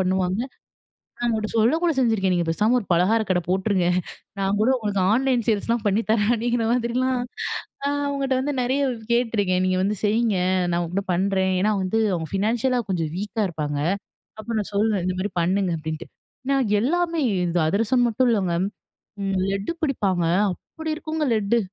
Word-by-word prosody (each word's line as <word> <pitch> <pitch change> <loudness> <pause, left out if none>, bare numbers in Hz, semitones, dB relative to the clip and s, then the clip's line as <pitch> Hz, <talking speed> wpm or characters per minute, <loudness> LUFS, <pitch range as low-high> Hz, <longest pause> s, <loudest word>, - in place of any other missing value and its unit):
பண்ணுவாங்க 185 +2 0 0.8
நான் 240 - -2
அவுங்கள்கிட்ட 220 -2 -1
சொல்லக்கூட 325 +10 +3
செஞ்சிருக்கேன், 220 -7 +2
நீங்க 175 -1 0
பேசாம 210 +9 +2
ஒரு 205 - -9
பலகாரக் 205 +5 +2
கடை 180 - +2
போட்டுருங்க 190 -1 +1 0.5
நான் 195 +1 +1
கூட 225 - +3
உங்களுக்கு 205 -4 -1
ஆன்லைன் 250 -1 +1
சேல்ஸ்லாம் 225 +2 0
பண்ணி 210 +3 +2
தரேன், 220 0 +2
அப்படிங்கிற 235 0 0
மாதிரிலாம் 250 +1 0 0.6
நா 280 - +1 0.2
அவுங்கள்ட்ட 275 -2 0
வந்து 290 +2 -1
நிறைய 260 +3 0 0.3
கேட்டுருக்கேன். 205 -6 +1
நீங்க 185 0 +1
வந்து 205 +2 0
செய்ங்க 215 -1 +2 0.3
நான் 170 - +1
உங்கள்ட்ட 190 +4 -3
பண்ணுறேன். 190 +1 +1
ஏன்னா 210 +2 +2
வந்து 185 +4 0
அவங்க 165 -2 -2
ஃபினான்ஷியலா 235 +5 +1
கொஞ்சம் 165 -5 -1
வீக்கா 210 +2 -3
இருப்பாங்க. 150 -3 -3 0.6
அப்ப 225 - -14
நான் 205 - -5
சொல்லுவேன் 205 -3 +1
இந்த 185 - 0
மாதிரி 205 0 -3
பண்ணுங்க 185 +1 +1
அப்படின்ட்டு. 160 +1 -5 0.4
நான் 270 -4 +2
எல்லாமே 335 +6 0
இது 180 -3 0
அதிரசம் 225 +7 +2
மட்டும் 245 +3 +2
இல்லைங்க. 190 -6 +1 0.7
ம் 195 -1 -1
லெட்டு 195 +7 -2
பிடிப்பாங்க, 200 - 0 0.3
அப்படி 320 - -7
இருக்குங்க 315 0 -3
லெட்டு. 215 +2 +2
210 Hz, 155 wpm, -23 LUFS, 185-240 Hz, 0.8 s, சொல்லக்கூட